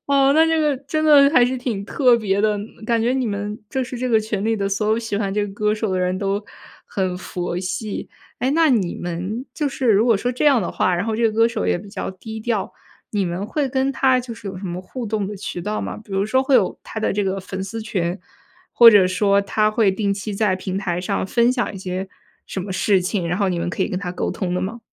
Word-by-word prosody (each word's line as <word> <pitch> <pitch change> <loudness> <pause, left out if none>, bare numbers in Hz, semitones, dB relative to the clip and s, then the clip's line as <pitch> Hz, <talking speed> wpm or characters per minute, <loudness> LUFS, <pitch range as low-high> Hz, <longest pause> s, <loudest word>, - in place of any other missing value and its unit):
哦， 275 -1 +4
那 320 +1 +5
这 325 0 +2
个 300 -3 +2
真 290 +4 -2
的 290 -2 +7
还 250 -5 +5
是 255 +1 -1
挺 235 -6 -3
特 245 +2 +3
别 200 -3 0
的。 210 -1 +2 0.3
感 230 -1 +2
觉 235 +3 +1
你 260 -2 0
们 205 0 -3
就 265 - -1
是 250 0 -7
这 255 +1 -1
个 225 -2 +4
群 210 -2 -3
里 225 0 +1
的 200 -1 -1
所 210 +2 -1
有 220 +1 +2
喜 225 -3 -3
欢 200 -2 -1
这 205 0 0
个 200 - -9
歌 210 +1 0
手 215 -1 -2
的 185 - 0
人 180 0 0
都 200 +1 -1 0.4
很 185 -2 -2
佛 175 -1 -4
系。 190 +3 -4 0.3
诶， 260 - 0
那 320 +1 +4
你 205 -9 +1
们 180 +8 -4
就 300 -3 -1
是 265 -2 -2
如 210 +1 +4
果 230 - +4
说 245 +5 -1
这 250 - -2
样 270 -8 +5
的 - - -3
话， 185 - +1
然 175 +2 -1
后 220 -1 -1
这 235 - -1
个 - - -9
歌 225 +1 +4
手 235 - -3
也 - - +2
比 200 - -11
较 200 0 -4
低 220 +4 -8
调， 220 -3 -2 0.4
你 205 -2 0
们 180 +3 -3
会 285 +3 -1
跟 265 +1 0
他 260 -1 +3
就 245 -1 -7
是 225 -2 -10
有 190 - -6
什 195 - -8
么 175 0 -4
互 240 +7 -7
动 210 -2 -1
的 205 +1 -6
渠 185 -2 -5
道 210 +4 -2
吗？ - - -4
比 205 - -13
如 195 +1 +1
说 260 +5 +2
会 270 0 +2
有 215 -7 +3
他 220 - -6
的 - - +1
这 205 0 0
个 195 0 -1
粉 190 0 -6
丝 220 +4 -5
群， 185 -4 -2 0.5
或 235 -1 +9
者 200 -4 +6
说 200 +2 +3
他 215 +1 +1
会 215 -2 +3
定 200 0 -1
期 205 +2 -5
在 200 -2 +1
平 185 +1 -4
台 175 -3 -2
上 185 - -2
分 235 +4 +3
享 245 -4 -2
一 - - -6
些 185 0 -4 0.4
什 190 - -4
么 190 +1 -5
事 190 +1 +2
情， 180 -1 -1
然 175 - 0
后 200 -1 +1
你 180 -2 -1
们 170 +1 -2
可 180 - -1
以 - - -1
跟 185 - -2
他 180 -2 -4
沟 - - -2
通 180 -2 -3
的 180 - 0
吗？ 210 +6 -4
210 Hz, 290 characters per minute, -21 LUFS, 190-240 Hz, 0.5 s, 或